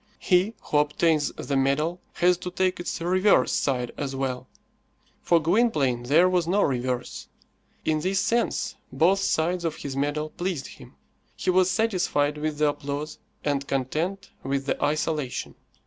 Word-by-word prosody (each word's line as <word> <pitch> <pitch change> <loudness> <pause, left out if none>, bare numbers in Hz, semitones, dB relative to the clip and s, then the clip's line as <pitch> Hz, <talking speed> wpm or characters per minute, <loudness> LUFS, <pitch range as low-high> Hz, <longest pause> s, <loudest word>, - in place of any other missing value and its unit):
He 190 +4 +2
who 150 - +1
obtains 150 0 +2
the 140 - -3
medal 150 +6 +1
has 180 +1 +3
to 180 - -5
take 185 0 0
its 175 - -4
reverse 185 +4 +3
side 125 -3 0
as 135 -2 -3
well. 130 -2 -3 0.7
For 170 - +3
Gwynplaine 155 - +2
there 150 +9 +4
was 180 -2 +1
no 200 +4 +3
reverse. 125 -2 -2 0.6
In 155 -1 +1
this 190 +4 0
sense, 235 +3 0 0.2
both 170 +9 +3
sides 175 -1 0
of 165 -2 -1
his 140 -2 -6
medal 145 +2 -1
pleased 175 -7 -3
him. - - -13 0.4
He - - 0
was 185 0 +4
satisfied 180 -9 +1
with 155 0 -2
the 150 0 +3
applause, 145 +1 -5 0.3
and 140 -1 0
content 155 +9 -2
with 135 0 -2
the 145 - -1
isolation. 150 -2 -1
155 Hz, 150 wpm, -25 LUFS, 140-180 Hz, 0.7 s, there